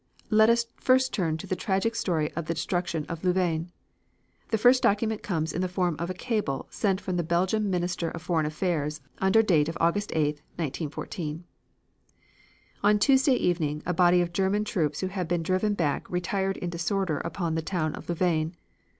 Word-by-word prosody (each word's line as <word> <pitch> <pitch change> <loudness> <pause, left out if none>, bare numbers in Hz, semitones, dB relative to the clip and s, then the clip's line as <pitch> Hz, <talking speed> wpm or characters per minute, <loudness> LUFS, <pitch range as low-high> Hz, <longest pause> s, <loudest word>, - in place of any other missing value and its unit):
Let 220 +1 +6
us 235 0 +3
first 260 0 +3
turn 165 -6 0
to - - -8
the 185 - -2
tragic 195 +4 0
story 160 -8 0
of 170 -1 -5
the 165 - -1
destruction 175 -4 -2
of 165 0 -6
Louvain. 175 -2 0 0.8
The 220 - +2
first 245 +4 +5
document 215 +1 +1
comes 160 -5 -2
in 180 - -1
the 185 - +1
form 180 -2 0
of 170 +1 -3
a 185 - -3
cable 205 - -2
sent 195 -3 0
from 185 -3 -3
the 175 - +1
Belgian 185 +5 +1
Minister 175 -2 -1
of 170 - -8
Foreign 160 -4 +1
Affairs 155 -2 -1 0.2
under 190 +4 +4
date 165 -7 +3
of 165 - -5
August 200 +5 +1 0.5
8,1914: 155 +1 -4 1.4
"On 210 +1 +4
Tuesday 265 +3 +4
evening 155 -7 0
a 180 - 0
body 180 +1 +5
of 170 -1 -2
German 195 +3 +1
troops 155 -8 -1
who 185 - 0
had 185 -3 -3
been 170 -1 0
driven 185 +4 +1
back 150 -7 -1
retired 190 +2 -1
in 175 - -4
disorder 170 -2 -1
upon 170 -4 -3
the 160 - 0
town 155 -2 -2
of - - -9
Louvain. 170 -1 0
180 Hz, 180 wpm, -27 LUFS, 165-200 Hz, 1.4 s, Let